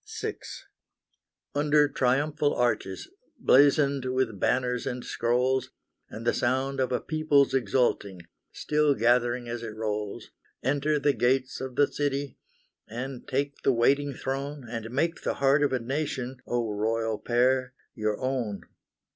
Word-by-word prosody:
VI. -, -, -3 dB, 1.1 s
Under 150 Hz, 0 st, +3 dB
triumphal 145 Hz, +3 st, +1 dB
arches, 120 Hz, -6 st, -1 dB, 0.3 s
blazoned 140 Hz, -, +4 dB
with 130 Hz, -5 st, -1 dB
banners 125 Hz, +2 st, 0 dB
and 125 Hz, -1 st, -4 dB
scrolls, 125 Hz, +2 st, 0 dB, 0.4 s
And 115 Hz, +1 st, -8 dB
the 120 Hz, -, +3 dB
sound 130 Hz, +2 st, 0 dB
of 130 Hz, -1 st, 0 dB
a 125 Hz, -, +1 dB
People's 155 Hz, -3 st, +2 dB
exulting, 120 Hz, -7 st, 0 dB, 0.3 s
still 150 Hz, -1 st, +1 dB
gathering 120 Hz, +1 st, +2 dB
as 120 Hz, 0 st, -4 dB
it 110 Hz, -2 st, -6 dB
rolls, 105 Hz, -2 st, -4 dB, 0.3 s
Enter 145 Hz, +2 st, +1 dB
the 145 Hz, 0 st, +2 dB
gates 130 Hz, +1 st, 0 dB
of 130 Hz, -1 st, -5 dB
the 145 Hz, -, +5 dB
city, 140 Hz, -2 st, -3 dB, 0.5 s
and 125 Hz, +3 st, -6 dB
take 140 Hz, +2 st, -2 dB
the -, -, +3 dB
waiting 140 Hz, +4 st, +2 dB
throne, 135 Hz, +1 st, -4 dB
And 115 Hz, -1 st, -5 dB
make 160 Hz, +7 st, -1 dB
the -, -, -1 dB
heart 140 Hz, +1 st, +3 dB
of 145 Hz, -, +2 dB
a 130 Hz, -, +2 dB
Nation, 130 Hz, 0 st, -3 dB
O 120 Hz, -3 st, -1 dB
Royal 110 Hz, +1 st, -1 dB
Pair, 130 Hz, +2 st, +1 dB, 0.2 s
your 105 Hz, -2 st, -2 dB
own. 125 Hz, -6 st, -2 dB
130 Hz, 140 wpm, -27 LUFS, 120-140 Hz, 1.1 s, the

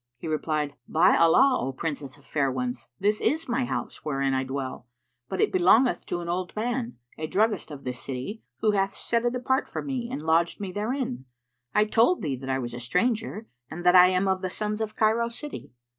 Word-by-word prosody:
He 120 Hz, -, -7 dB
replied, 155 Hz, -2 st, -1 dB
"By 175 Hz, +4 st, +4 dB
Allah, 250 Hz, +11 st, +5 dB
O 135 Hz, -, -2 dB
Princess 145 Hz, -2 st, -4 dB
of -, -, -21 dB
fair 140 Hz, -3 st, 0 dB
ones, 125 Hz, -1 st, -3 dB
this 210 Hz, +2 st, +1 dB
is 320 Hz, +2 st, +1 dB
my 250 Hz, +1 st, 0 dB
house -, -, -4 dB
wherein 135 Hz, -2 st, 0 dB
I 130 Hz, 0 st, +1 dB
dwell; 130 Hz, -2 st, -5 dB, 0.4 s
but 190 Hz, -, -3 dB
it -, -, +3 dB
belongeth 205 Hz, +8 st, +4 dB
to 175 Hz, -, -2 dB
an 170 Hz, -, -6 dB
old 180 Hz, +1 st, -3 dB
man, 235 Hz, -, -2 dB, 0.2 s
a 155 Hz, -, -2 dB
druggist 210 Hz, +4 st, +1 dB
of 145 Hz, -2 st, -9 dB
this 125 Hz, -1 st, -5 dB
city, 135 Hz, -, -5 dB, 0.2 s
who 215 Hz, -, +4 dB
hath 195 Hz, -1 st, 0 dB
set 235 Hz, 0 st, -1 dB
it 240 Hz, +1 st, +1 dB
apart 260 Hz, +2 st, 0 dB
for -, -, -4 dB
me 255 Hz, -4 st, -3 dB
and 150 Hz, -, -4 dB
lodged 165 Hz, +1 st, +2 dB
me 195 Hz, -2 st, -4 dB
therein. 210 Hz, -, -3 dB, 0.5 s
I 210 Hz, -, +5 dB
told 230 Hz, -, +3 dB
thee 145 Hz, -4 st, -1 dB
that 135 Hz, +1 st, -7 dB
I 130 Hz, -, +1 dB
was 120 Hz, -2 st, -4 dB
a 120 Hz, -, -5 dB
stranger 220 Hz, -, -1 dB, 0.2 s
and 175 Hz, +2 st, -7 dB
that 180 Hz, -, +6 dB
I 180 Hz, 0 st, +9 dB
am 185 Hz, +1 st, +1 dB
of 190 Hz, -1 st, +1 dB
the 185 Hz, -, -2 dB
sons 210 Hz, +3 st, -3 dB
of 215 Hz, 0 st, -3 dB
Cairo 225 Hz, +2 st, +2 dB
city." 290 Hz, +5 st, -8 dB
185 Hz, 215 wpm, -26 LUFS, 145-225 Hz, 0.5 s, I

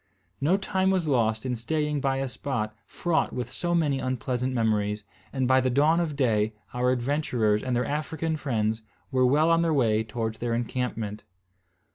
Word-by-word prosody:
No 170 Hz, +7 st, +3 dB
time 190 Hz, -1 st, 0 dB
was 185 Hz, -4 st, +1 dB
lost 110 Hz, -4 st, +1 dB
in 125 Hz, -1 st, -1 dB
staying 150 Hz, +5 st, -1 dB
by 135 Hz, 0 st, +1 dB
a 135 Hz, 0 st, -1 dB
spot 120 Hz, -4 st, -3 dB
fraught 170 Hz, -2 st, 0 dB
with 125 Hz, -, -4 dB
so 175 Hz, 0 st, -1 dB
many 145 Hz, -5 st, +1 dB
unpleasant 130 Hz, 0 st, -1 dB
memories; 105 Hz, -3 st, 0 dB, 0.3 s
and 130 Hz, -2 st, 0 dB
by 130 Hz, 0 st, +5 dB
the 130 Hz, -, +1 dB
dawn 150 Hz, +6 st, +3 dB
of 160 Hz, -4 st, -1 dB
day 110 Hz, -5 st, +1 dB, 0.2 s
our 125 Hz, +1 st, +1 dB
adventurers 125 Hz, -5 st, +1 dB
and 130 Hz, -2 st, -1 dB
their 125 Hz, -, +1 dB
African 155 Hz, +2 st, -2 dB
friends 110 Hz, -7 st, -1 dB, 0.3 s
were 130 Hz, -1 st, +3 dB
well 155 Hz, +5 st, +4 dB
on 165 Hz, 0 st, +4 dB
the 165 Hz, -1 st, +2 dB
way 110 Hz, -7 st, +2 dB
towards 110 Hz, 0 st, -4 dB
their 120 Hz, -1 st, -1 dB
encampment. 115 Hz, -3 st, -3 dB
130 Hz, 175 wpm, -27 LUFS, 115-150 Hz, 0.3 s, by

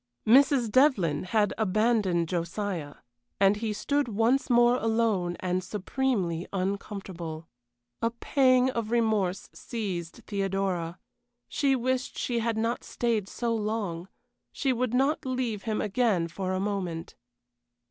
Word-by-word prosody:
Mrs. 255 Hz, -1 st, +5 dB
Devlyn 200 Hz, -, +3 dB
had 205 Hz, +2 st, +1 dB
abandoned 210 Hz, -4 st, +2 dB
Josiah, 170 Hz, -2 st, -3 dB, 0.4 s
and 195 Hz, +1 st, +4 dB
he 220 Hz, 0 st, -2 dB
stood 285 Hz, +6 st, 0 dB
once 230 Hz, +6 st, +1 dB
more 240 Hz, 0 st, +5 dB
alone 220 Hz, -7 st, 0 dB
and 185 Hz, 0 st, -1 dB
supremely 195 Hz, -4 st, -1 dB
uncomfortable. 185 Hz, -4 st, -4 dB, 0.5 s
A 230 Hz, -, +2 dB
pang 255 Hz, +1 st, +3 dB
of 230 Hz, -3 st, -3 dB
remorse 215 Hz, -5 st, +1 dB
seized 195 Hz, -3 st, -5 dB
Theodora; 195 Hz, -4 st, -2 dB, 0.5 s
she 275 Hz, -2 st, +1 dB
wished 255 Hz, +1 st, -1 dB
she 240 Hz, -2 st, -1 dB
had 230 Hz, -1 st, -1 dB
not 230 Hz, +2 st, -1 dB
stayed 225 Hz, -5 st, -1 dB
so 235 Hz, -1 st, -2 dB
long; 210 Hz, -5 st, -3 dB, 0.4 s
she 270 Hz, -3 st, 0 dB
would 250 Hz, 0 st, -1 dB
not 275 Hz, +4 st, +2 dB
leave 250 Hz, -5 st, -2 dB
him 215 Hz, -, 0 dB
again 205 Hz, -5 st, +1 dB
for 185 Hz, +3 st, -4 dB
a 185 Hz, -, -1 dB
moment. 190 Hz, -5 st, -3 dB
215 Hz, 125 wpm, -28 LUFS, 185-240 Hz, 0.5 s, Mrs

